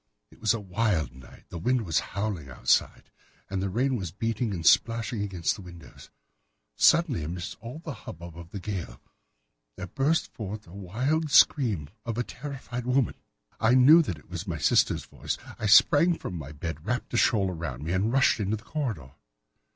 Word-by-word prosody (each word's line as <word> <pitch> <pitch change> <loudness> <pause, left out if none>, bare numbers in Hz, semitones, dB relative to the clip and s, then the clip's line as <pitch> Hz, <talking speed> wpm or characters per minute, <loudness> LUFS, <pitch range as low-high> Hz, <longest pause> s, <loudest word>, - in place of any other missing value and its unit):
It - - -20
was 110 +1 +3
a - - -4
wild 90 - -1
night. 65 0 -15
The 85 - -6
wind 125 +5 +1
was 85 - +2
howling 100 -8 -4
outside, 65 - 0 0.4
and 95 -1 -1
the 100 - -1
rain 130 +7 +1
was 95 -5 -4
beating 115 +5 -2
and 85 -4 -4
splashing 115 +2 +3
against 95 -5 -1
the 105 - -10
windows. 85 -2 -13 0.7
Suddenly, 165 - +4
amid 85 +3 -5 0.2
all 120 +6 -8
the 160 -2 -7
hubbub 85 -6 -10
of 85 0 -10
the 100 - -6
gale, 90 -10 -5 0.8
there 95 - -6
burst 140 - 0
forth 105 -1 -6
the 85 - -16
wild 125 - -1
scream 115 - +4 0.2
of 115 -1 -4
a 120 - +1
terrified 125 -2 -7
woman. 125 -1 +2 0.5
I 115 +3 +4
knew 145 +6 +8
that 90 - -3
it 75 - -18
was - - -6
my - - -3
sister's - - +2
voice. - - -4 0.2
I 110 - -1
sprang 160 +10 +6
from - - -6
my 75 -3 -7
bed, 75 0 -6
wrapped 125 +6 -3
a - - +1
shawl 100 -5 +3
round 75 -6 -5
me, 85 +3 -2
and 100 +4 +1
rushed 135 -2 +3
into 105 +1 -1
the 105 - -15
corridor. 110 - -4
105 Hz, 185 wpm, -27 LUFS, 85-125 Hz, 0.8 s, knew